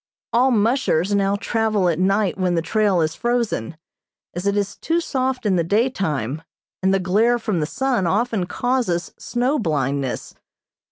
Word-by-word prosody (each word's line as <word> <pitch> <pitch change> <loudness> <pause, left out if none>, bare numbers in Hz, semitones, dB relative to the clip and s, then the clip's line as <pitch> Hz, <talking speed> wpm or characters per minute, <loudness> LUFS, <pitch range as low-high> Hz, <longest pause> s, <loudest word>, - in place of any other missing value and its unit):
All 250 +3 +4
"mushers" 215 - +1
now 200 0 +2
travel 215 -2 0
at 165 -1 0
night 195 +1 +2
when 185 -2 0
the 165 - 0
trail 200 -1 +2
is 155 0 0
frozen, 230 - -1 0.6
as 180 +3 -3
it 200 0 +1
is 200 -1 -1
too 330 +1 0
soft 260 -6 -2
in 190 -3 +2
the 170 - +2
daytime, 165 - 0 0.4
and 190 0 +2
the 195 - +3
glare 205 +6 +2
of 235 - -7
the 170 -8 0
sun 245 -4 0
often 210 0 0
causes 240 -6 -1
snow 250 +5 0
blindness. 140 - -2
200 Hz, 160 wpm, -21 LUFS, 175-240 Hz, 0.6 s, All